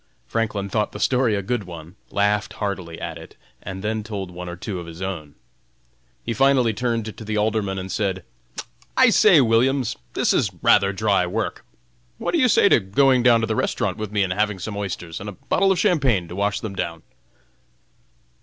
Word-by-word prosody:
Franklin 105 -3 -2
thought 105 +1 -1
the - - -7
story 125 -4 +2
a 100 - -2
good 120 0 -2
one, 85 0 -10
laughed 105 +1 0
heartily 95 -5 -4
at - - -6
it, - - -13 0.3
and 95 0 -7
then 110 +1 -1
told 100 -4 -5
one 90 0 -7
or 85 - -6
two 90 +1 -5
of 85 - -8
his 85 0 -10
own. 85 -6 -5 0.9
He 115 - -1
finally 130 -3 +3
turned 115 -2 -2
to - - -9
the 110 0 -3
Alderman, 105 -2 0
and 95 0 -5
said; 95 -4 -1 0.7
"I - - +6
say, - - +6
Williams, 125 +3 +2 0.2
this - - +2
is - - +2
rather 100 -1 +5
dry 100 -2 +1
work. 110 +5 -3 0.5
What - - -2
do 340 - +1
you 255 - +5
say 210 - +5
to - - +6
going 130 +6 +3
down 120 -2 +5
to - - +1
the - - -2
restaurant - - -1
with 110 -2 -5
me, 105 -1 +2
and 90 -1 -1
having 105 +1 0
some 100 +3 -6
oysters 90 -5 -5
and 105 - -6
a - - -8
bottle 195 - +1
of 190 - +1
champagne 140 - +2
to 90 - -7
wash 100 +1 -1
them 105 -3 -5
down?" 85 -3 -4
105 Hz, 200 wpm, -22 LUFS, 95-115 Hz, 0.9 s, I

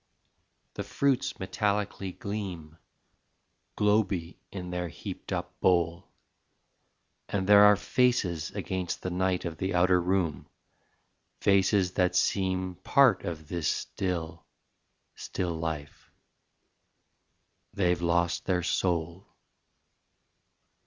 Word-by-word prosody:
The - - -4
fruits 140 -3 0
metallically 100 0 -2
gleam, 95 -8 -6 1.0
Globey 100 -5 +1
in 90 -2 -6
their 90 0 -2
heaped - - -8
up - - -4
bowl, 85 -1 +1 1.2
And 95 -2 -1
there 105 +1 +8
are 105 0 +7
faces 100 -8 +1
against 95 -3 -4
the 90 - -2
night 90 0 0
Of 85 -2 -4
the 95 0 -1
outer 90 0 +4
room 85 -5 -1 0.9
faces 100 -1 +3
that 90 -1 +1
seem 95 -2 0
Part 130 -1 +3
of 80 -3 -5
this 85 -1 -2
still, 85 -3 -3 0.7
still 90 -2 -3
life... 80 -3 -5 1.6
they've 90 -3 +1
lost 85 0 +1
their 90 -2 +1
soul. 85 +1 -1
90 Hz, 100 wpm, -28 LUFS, 85-100 Hz, 1.6 s, there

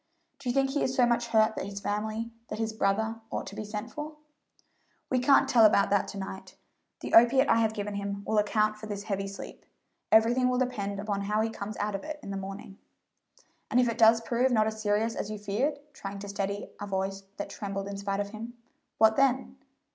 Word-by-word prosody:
Do 270 -2 -4
you - - +1
think 270 0 +2
he 285 - 0
is 260 - 0
so 250 - +5
much 240 0 +1
hurt 220 -1 +3
that - - -4
his 200 0 -6
family 215 +3 -3 0.2
that - - -5
his 220 0 -2
brother 220 +2 0
ought - - -3
to 200 - -9
be 215 - -4
sent 210 +2 -6
for?" 300 +1 -6 1.0
"We 255 - +3
can't 275 +2 +5
tell 235 -2 +5
about 200 -2 +5
that 200 -1 +2
to - - -7
night. 190 0 -7 0.5
The - - -6
opiate 260 +4 +7
I - - +5
have 220 -1 +1
given 205 -1 -3
him 200 0 -4
will 220 - +2
account 215 +1 +1
for 215 0 -8
this 205 -1 -5
heavy 195 -2 -2
sleep. 195 0 -9 0.5
Everything 240 +3 +5
will 250 - +1
depend 205 -6 -2
upon 200 -1 -2
how 210 +2 0
he 225 0 0
comes 210 -1 -6
out 210 0 -1
of 195 - -4
it 305 -1 -6
in 200 - -6
the - - -3
morning." 195 0 -8 0.9
"And 250 - +3
if 250 - +4
it 230 - -2
does 225 0 +6
prove 245 +3 +1
not 215 -3 +4
as 220 0 -3
serious 215 +2 +1
as 205 - -3
you 215 - -4
feared" 215 +9 -1 0.2
trying 200 -5 -7
to 200 +1 -7
steady 200 0 -3
a 205 - -5
voice 195 0 -2 0.2
that 200 - -5
trembled 195 -1 -4
in 200 - -5
spite 200 0 -2
of 200 0 -2
him 225 +3 -8 0.4
"what 220 0 +5
then?" 265 -1 +2
215 Hz, 225 wpm, -29 LUFS, 200-235 Hz, 1.0 s, opiate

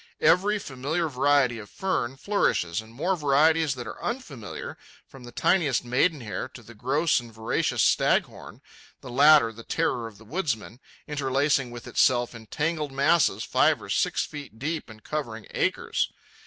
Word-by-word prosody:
Every 200 +5 +4
familiar 155 +1 -2
variety 135 -3 +2
of 105 - -10
fern 135 -9 -2
flourishes, 115 - 0
and 110 0 -15
more 170 +11 0
varieties 155 0 +3
that 125 -1 -6
are - - -9
unfamiliar, 145 - -5 0.3
from 130 -2 -13
the 120 - -10
tiniest 145 -3 +1
maidenhair 125 - 0
to 120 - -11
the 120 - -13
gross 140 +9 +1
and 120 -1 -11
voracious 110 0 0
staghorn, - - +1 0.4
the 125 - -9
latter 140 -2 +6
the 115 +1 -11
terror 115 0 -1
of 110 -3 -13
the 110 - -16
woodsmen, 125 - -3 0.3
interlacing 140 -2 +1
with 120 0 -9
itself 120 -1 +2
in 110 -2 -11
tangled 155 0 -2
masses 140 +4 +2
five - - +3
or - - -11
six - - +1
feet 145 -7 -9
deep 155 +5 -3
and 110 -1 -13
covering 115 -8 -4
acres. - - 0
135 Hz, 155 wpm, -26 LUFS, 115-155 Hz, 0.4 s, latter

